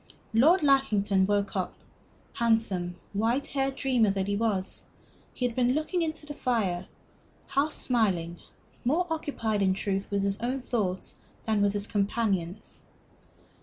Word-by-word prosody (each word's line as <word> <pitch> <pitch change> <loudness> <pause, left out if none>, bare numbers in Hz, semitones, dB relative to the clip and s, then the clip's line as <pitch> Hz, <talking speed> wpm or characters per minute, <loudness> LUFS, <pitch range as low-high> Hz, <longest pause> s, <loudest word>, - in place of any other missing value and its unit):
Lord 310 +11 +5
Lackington 210 -9 +3
woke 205 -1 0
up. 185 -2 -2 0.6
Handsome, 220 -7 +1 0.2
white 230 +7 +1
haired 270 -1 -1
dreamer 250 -6 +2
that 195 -1 0
he 200 - 0
was, 200 -3 -1 0.5
he 250 - -2
had 240 -2 -1
been 250 0 +3
looking 310 +5 0
into 315 -2 -3
the 295 - -6
fire, 200 -10 -1 0.6
half 280 +3 +1
smiling, 185 - 0 0.4
more 315 +9 +2
occupied, 230 -9 -1
in 190 -1 +3
truth, 195 0 -2
with 200 -1 0
his 200 0 0
own 250 +3 -1
thoughts 205 -7 -2 0.2
than 220 -2 +1
with 200 0 +3
his 205 -1 -1
companions. 200 -3 -1
220 Hz, 140 wpm, -28 LUFS, 195-265 Hz, 0.6 s, Lord